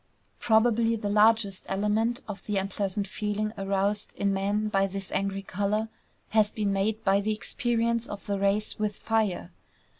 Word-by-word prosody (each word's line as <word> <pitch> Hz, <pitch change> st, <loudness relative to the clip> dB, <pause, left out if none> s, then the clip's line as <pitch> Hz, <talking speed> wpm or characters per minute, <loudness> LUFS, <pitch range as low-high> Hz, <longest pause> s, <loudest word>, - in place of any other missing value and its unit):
Probably 230 Hz, 0 st, +3 dB
the 210 Hz, -2 st, -3 dB
largest 210 Hz, -2 st, +3 dB
element 210 Hz, +4 st, 0 dB
of 210 Hz, -2 st, -7 dB
the 210 Hz, -2 st, 0 dB
unpleasant 195 Hz, +1 st, -2 dB
feeling 210 Hz, +2 st, -2 dB
aroused 200 Hz, +1 st, -1 dB
in 200 Hz, -1 st, +1 dB
man 200 Hz, +2 st, 0 dB
by 195 Hz, -2 st, +2 dB
this 195 Hz, 0 st, -6 dB
angry 195 Hz, 0 st, -1 dB
color 205 Hz, +3 st, -1 dB, 0.4 s
has 215 Hz, -1 st, +3 dB
been 205 Hz, -2 st, -1 dB
made 210 Hz, +3 st, 0 dB
by 195 Hz, +1 st, +3 dB
the 215 Hz, +1 st, 0 dB
experience 235 Hz, +2 st, 0 dB
of 205 Hz, -, -7 dB
the 200 Hz, -1 st, -1 dB
race 200 Hz, +2 st, 0 dB
with 210 Hz, -1 st, -1 dB
fire. 215 Hz, -6 st, -1 dB
205 Hz, 155 wpm, -28 LUFS, 195-220 Hz, 0.4 s, Probably